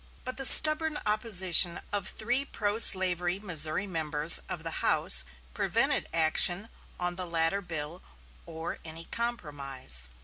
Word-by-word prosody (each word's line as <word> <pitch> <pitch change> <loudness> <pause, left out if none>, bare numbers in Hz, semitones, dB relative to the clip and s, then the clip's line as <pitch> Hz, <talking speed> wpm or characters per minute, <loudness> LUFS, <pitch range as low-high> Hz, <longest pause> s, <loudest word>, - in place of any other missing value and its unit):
But 255 -1 -9
the 270 - +2
stubborn 310 +2 +5
opposition 190 -5 +2
of 200 -2 -4
three 245 +5 -3
pro 210 -5 -5
slavery 180 -3 +2
Missouri 165 -3 -1
members 155 -3 +4
of - - -8
the - - -5
House 65 - +2 0.3
prevented - - -2
action 170 +5 +1 0.3
on 175 0 -4
the 180 -1 -4
latter 165 +3 -1
bill 165 -1 -7 0.5
or 165 0 -9
any 165 +1 -10
compromise. 140 - -5
175 Hz, 130 wpm, -26 LUFS, 160-210 Hz, 0.5 s, stubborn